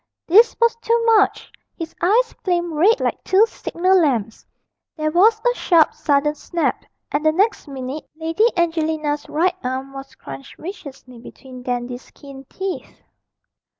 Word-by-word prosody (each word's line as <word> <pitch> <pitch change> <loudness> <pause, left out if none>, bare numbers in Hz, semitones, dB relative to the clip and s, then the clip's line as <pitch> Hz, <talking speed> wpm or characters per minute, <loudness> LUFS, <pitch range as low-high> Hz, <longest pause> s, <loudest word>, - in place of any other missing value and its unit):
This 440 +7 +5
was 465 -1 +3
too 465 0 +1 0.2
much: 410 -2 +1 0.3
his 330 -2 -6
eyes 460 +7 +2
flamed 345 -2 -1
red 390 +11 +3
like - - -2
two 390 +4 +4
signal 370 -4 +1
lamps, 235 -8 -1 0.5
there 310 0 -1
was 425 +7 +4
a 485 - +4
sharp 335 -9 +3
sudden 290 0 +1
snap, 335 +2 -2 0.3
and 290 +1 -1
the 310 - +4
next 390 +2 0
minute 270 +1 -7
Lady 325 +7 +1
Angelina's 315 -3 -1
right 340 +5 +1
arm 260 +2 -4
was 270 0 -10
crunched 135 0 -11
viciously 275 - -10
between 255 +1 -12
Dandy's 245 0 -4
keen 275 -2 -12
teeth. 380 +6 -6
315 Hz, 145 wpm, -20 LUFS, 270-375 Hz, 0.5 s, This